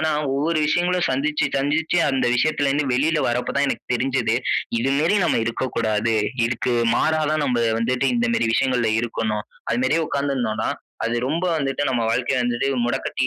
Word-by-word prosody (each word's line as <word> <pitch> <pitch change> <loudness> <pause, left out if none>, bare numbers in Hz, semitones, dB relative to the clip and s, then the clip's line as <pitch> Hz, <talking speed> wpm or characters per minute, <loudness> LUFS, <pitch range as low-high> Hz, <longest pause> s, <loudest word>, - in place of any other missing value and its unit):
ஆனா 155 0 +1 0.2
ஒவ்வொரு 155 +3 0
விஷயங்களும் 175 +2 +1
சந்திச்சு, 150 +3 0
சந்திச்சு, 150 +5 +1
அந்த 130 -2 0
விஷயத்லருந்து 145 +1 +1
வெளியில 150 +4 +1
வர்றப்ப 125 +3 -2
தான் 140 - +2
எனக்கு - - -3
தெரிஞ்சது. 125 -2 0 0.4
இது 135 +3 +1
மேரி 170 +7 +2
நம்ம - - +2
இருக்ககூடாது. 115 -2 -1 0.3
இதுக்கு 120 +1 -1 0.2
மாறா 155 0 +1
தான் 155 -1 0
நம்ம 120 -2 +1 0.2
வந்துட்டு 125 +2 +1
இந்த 245 +1 +1
மேரி 115 - +1
விஷயங்கள்ல 125 -4 +1
இருக்கணும். 110 -2 -2 0.3
அது 120 +1 0
மாரியே 160 +5 +1
உட்கார்ந்துருந்தோன்னா 130 -6 -1 0.4
அது 115 +1 -1
ரொம்ப 165 +5 -1
வந்துட்டு 135 0 -1
நம்ம 120 -3 0
வாழ்க்கை 125 +2 0
வந்து 120 +2 -1 0.2
முடக்கட்டி 120 - -1
135 Hz, 160 wpm, -22 LUFS, 120-155 Hz, 0.4 s, தான்